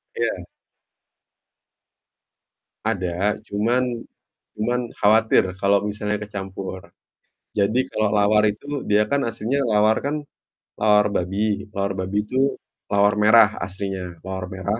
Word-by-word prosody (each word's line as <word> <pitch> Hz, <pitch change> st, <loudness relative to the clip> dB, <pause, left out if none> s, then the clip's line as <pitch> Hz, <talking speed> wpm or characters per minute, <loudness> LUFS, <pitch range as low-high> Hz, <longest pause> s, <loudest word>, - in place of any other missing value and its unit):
Iya. -, -, -2 dB, 2.4 s
Ada, 95 Hz, +4 st, -1 dB
cuman 120 Hz, +3 st, 0 dB, 0.5 s
cuman 120 Hz, +4 st, 0 dB, 0.2 s
khawatir 110 Hz, +1 st, +4 dB, 0.2 s
kalau 100 Hz, 0 st, +3 dB
misalnya 105 Hz, 0 st, -2 dB
kecampur. 95 Hz, -2 st, -6 dB, 0.7 s
Jadi 110 Hz, +6 st, +1 dB
kalau 110 Hz, -1 st, +1 dB
lawar 105 Hz, 0 st, +3 dB
itu, 140 Hz, +7 st, -5 dB
dia 105 Hz, +1 st, +4 dB
kan 140 Hz, +6 st, 0 dB
aslinya 115 Hz, +5 st, -1 dB
lawar 105 Hz, +1 st, +3 dB
kan 140 Hz, +2 st, -2 dB, 0.6 s
lawar 105 Hz, -1 st, +4 dB
babi. 100 Hz, +4 st, -1 dB
Lawar 100 Hz, 0 st, -1 dB
babi 100 Hz, +3 st, -1 dB
itu 130 Hz, +5 st, 0 dB, 0.3 s
lawar 100 Hz, 0 st, +3 dB
merah 110 Hz, 0 st, +7 dB
aslinya. 95 Hz, -2 st, -5 dB
Lawar 95 Hz, 0 st, -5 dB
merah. 95 Hz, +3 st, -3 dB
105 Hz, 110 wpm, -22 LUFS, 100-110 Hz, 2.4 s, merah